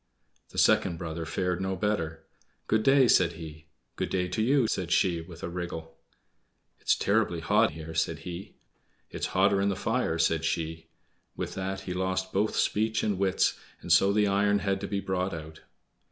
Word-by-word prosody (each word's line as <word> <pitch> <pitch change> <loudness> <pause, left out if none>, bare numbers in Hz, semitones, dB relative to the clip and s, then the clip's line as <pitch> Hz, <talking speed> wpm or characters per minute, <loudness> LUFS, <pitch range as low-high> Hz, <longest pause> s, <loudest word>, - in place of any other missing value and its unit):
The - - -12
second 85 -3 +3
brother 80 -1 -5
fared 90 +1 -1
no 95 0 -1
better. 80 -6 -2 0.4
"Good 110 0 +2
day!" 135 +2 +5
said 90 -6 +4
he. 80 -1 -10 0.3
"Good - - -2
day 90 -1 0
to 100 - -1
you," 130 +2 +3
said 90 -5 -2
she, 85 -1 +2
with 85 0 -12
a - - -2
wriggle. 85 -2 -6 0.8
"It's - - +2
terribly 100 -4 +1
hot 80 - +3
here!" 80 +1 -8
said 80 0 0
he. 90 +2 -7 0.6
"It's - - -3
hotter 100 +1 +4
in 100 - +2
the 100 - -1
fire," 115 -8 -1
said 80 -1 +1
she. 80 0 -2 0.5
With - - -4
that 95 0 -4
he 95 -1 -5
lost 95 0 -2
both 105 +3 +1
speech 110 +1 +1
and 100 -3 0
wits, 95 -1 +1 0.2
and - - -5
so 100 - +6
the 105 +1 +3
iron 100 +1 +2
had 100 0 0
to 100 - -3
be 100 0 -2
brought 95 -1 -2
out. 80 0 -9
95 Hz, 180 wpm, -28 LUFS, 80-100 Hz, 0.8 s, so